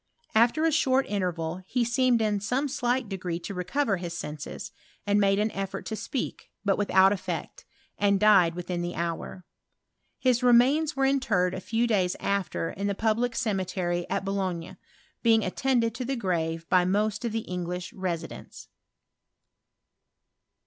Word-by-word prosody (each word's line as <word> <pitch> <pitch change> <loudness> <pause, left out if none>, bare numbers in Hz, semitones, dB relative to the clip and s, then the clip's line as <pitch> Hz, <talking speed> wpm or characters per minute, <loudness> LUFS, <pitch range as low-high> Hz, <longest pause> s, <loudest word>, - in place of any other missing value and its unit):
After 240 +8 +4
a 325 - +3
short 270 -3 +3
interval, 180 -3 -2
he 250 +3 +1
seemed 240 -1 +2
in 210 -2 +1
aomo 250 +8 -1
slight 250 -2 -1
degree 185 -4 -3
to 200 - -6
recover 195 +4 0
his 175 -1 -5
senses, 150 -2 -6 0.3
and 205 0 +3
made 195 -1 +3
an 215 +1 +1
effort 195 0 -4
to 220 - -3
speak, 250 +3 -4 0.2
but 195 -1 +3
without 195 -1 +4
effect, 180 -5 -5 0.3
and 200 -1 +3
died 190 -5 +5
within 180 0 -3
the 175 0 -4
hour. 170 +2 -4 0.7
His 250 -2 +2
remains 255 +6 +4
were 270 0 +2
interred 215 -10 +2
a 185 - -3
few 230 +4 0
days 190 -6 +1
aft« 200 -1 -1
in 200 +4 -2
the 200 - -1
public 230 +3 0
cemetery 185 -5 -1
at 195 0 -1
Boulogne, 190 -4 -3 0.4
being 225 -2 +4
attended 230 +3 +1
to 230 - -4
the 270 +2 -2
grave 165 -6 -2
by 185 -1 +4
most 210 +4 0
of 235 - -1
the 225 +1 -1
English 180 -2 -5
residents. 175 -4 -6
200 Hz, 155 wpm, -27 LUFS, 180-235 Hz, 0.7 s, died